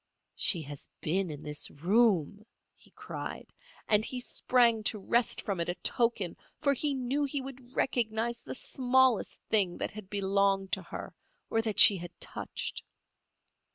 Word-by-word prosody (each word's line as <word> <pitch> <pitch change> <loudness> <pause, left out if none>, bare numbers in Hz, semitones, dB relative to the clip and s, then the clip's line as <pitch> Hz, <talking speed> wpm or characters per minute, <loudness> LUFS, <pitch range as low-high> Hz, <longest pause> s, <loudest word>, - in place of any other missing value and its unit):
"She 170 -5 +2
has 145 0 -8
been 185 +3 -1
in 150 -1 -8
this 150 0 -3
room," 200 +2 +1 0.3
he - - -20
cried, - - -8 0.3
and 210 0 +5
he 250 +2 -3
sprang 240 -2 +2
to 220 - +2
wrest 230 +4 0
from 195 -4 -3
it 170 - -2
a 175 - -1
token, 220 -2 0 0.2
for 280 -2 +2
he 285 +1 -1
knew 265 +3 -1
he 285 0 -2
would 260 -2 -10
recognize 235 -1 -1
the - - -6
smallest 260 -3 +1
thing 195 -5 +2
that - - -3
had 210 -2 -10
belonged 195 -1 +1
to - - 0
her - - -8 0.4
or 225 - +2
that 220 -2 -3
she 200 - +10
had 175 0 -10
touched. - - -5
215 Hz, 155 wpm, -30 LUFS, 190-245 Hz, 0.4 s, she